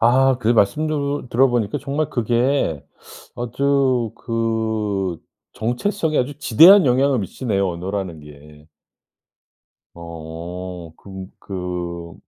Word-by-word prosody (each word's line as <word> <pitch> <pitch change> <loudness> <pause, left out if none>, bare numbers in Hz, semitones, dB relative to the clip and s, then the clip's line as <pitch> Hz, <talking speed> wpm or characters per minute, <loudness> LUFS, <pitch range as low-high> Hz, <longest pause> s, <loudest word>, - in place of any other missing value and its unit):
아 130 +2 +4
그 120 -3 -1
말씀도 140 +5 +1
들어 130 +3 +4
보니까 115 -4 -1
정말 145 +2 -2
그게 120 - 0 0.5
아주 130 -1 0
그 110 -6 -2 0.3
정체성에 150 - -1
아주 140 +3 -2
지대한 165 - +7
영향을 130 +1 +3
미치네요 100 -1 -2
언어라는 90 -1 -4
게. 75 +1 -15 1.3
어. 85 +1 -8
그 95 -1 -9
그 90 -3 -6
110 Hz, 200 characters per minute, -21 LUFS, 90-135 Hz, 1.3 s, 지대한